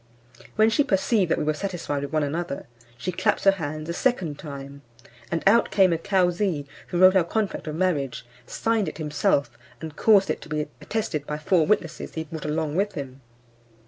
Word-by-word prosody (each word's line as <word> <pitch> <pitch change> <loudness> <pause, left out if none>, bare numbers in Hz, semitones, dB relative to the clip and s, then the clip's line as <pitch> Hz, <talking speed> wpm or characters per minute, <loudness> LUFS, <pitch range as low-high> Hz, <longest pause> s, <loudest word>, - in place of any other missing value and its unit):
When 220 +1 +4
she 290 - +3
perceived 195 -3 +1
that - - +2
we - - -1
were 155 +1 +1
satisfied 165 -5 -3
with 140 -1 -5
one 155 -1 +1
another, 155 +1 -3 0.3
she 185 - -3
claps 205 +3 0
her 195 - +7
hands 155 -4 -5
a 170 - -2
second 175 - 0
time, 140 -1 -8 0.5
and 165 - -2
out 225 +4 +5
came 190 -3 +4
a 165 - -1
Cauzee, 180 -3 +1 0.2
who 175 - -3
wrote 185 +1 +7
our 185 - +5
contract 205 0 -2
of 155 - -3
marriage, 155 -10 -1 0.2
signed 225 -3 0
it - - -5
himself, 150 -2 0 0.2
and 160 -1 -7
caused 200 0 +4
it - - -4
to - - -12
be 155 0 -1 0.2
attested 190 -10 -3
by 150 - -3
four 160 +1 +2
witnesses 170 -5 -1
he 160 - -2
brought 160 0 -8
along 150 0 -1
with 200 +3 0
him. 135 -4 -7
165 Hz, 195 wpm, -25 LUFS, 150-195 Hz, 0.5 s, her